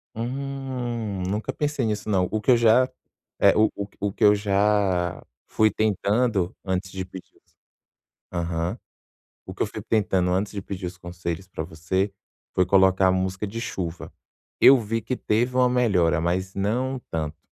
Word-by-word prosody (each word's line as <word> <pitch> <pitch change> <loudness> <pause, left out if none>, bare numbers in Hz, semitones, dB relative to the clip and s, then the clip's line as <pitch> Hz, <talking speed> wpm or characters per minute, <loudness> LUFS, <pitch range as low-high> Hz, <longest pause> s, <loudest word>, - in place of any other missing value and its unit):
Hum, 120 -4 -4
nunca 105 +3 -2
pensei 145 -4 -1
nisso 105 -1 -2
não. 95 -3 +2
O 110 - -1
que 130 - +3
eu 120 - +6
já, 120 +3 +4 0.5
eh, - - +6
o 110 0 +4 0.3
o 100 0 -1
que - - -3
eu 105 - +8
já 100 -3 +1 0.2
fui 110 0 +3
tentando 105 -1 +1
antes 95 0 -2
de 95 -1 -4
pedir, 95 0 -12
ass - - -37 0.8
aham. 85 0 -2 0.7
O - - -7
que - - -8
eu - - -2
fui - - -7
tentando 95 -5 +1
antes 95 +2 0
de 100 - -4
pedir 95 -1 -6
os 90 +1 -8
conselhos 90 0 -5
pra 85 -4 -5
você, 90 +4 -2 0.4
foi 90 - +3
colocar 95 0 +4
a - - +4
música 95 +2 -1
de 110 +3 -5
chuva. 90 -6 -5 0.5
Eu 135 -1 +8
vi 115 +1 -2
que 130 - -3
teve 120 +2 0
uma 125 -1 +4
melhora, 100 -10 +2
mas 95 +3 -1
não 125 +7 -1
tanto. 80 -1 -3
100 Hz, 170 wpm, -24 LUFS, 90-115 Hz, 0.8 s, eu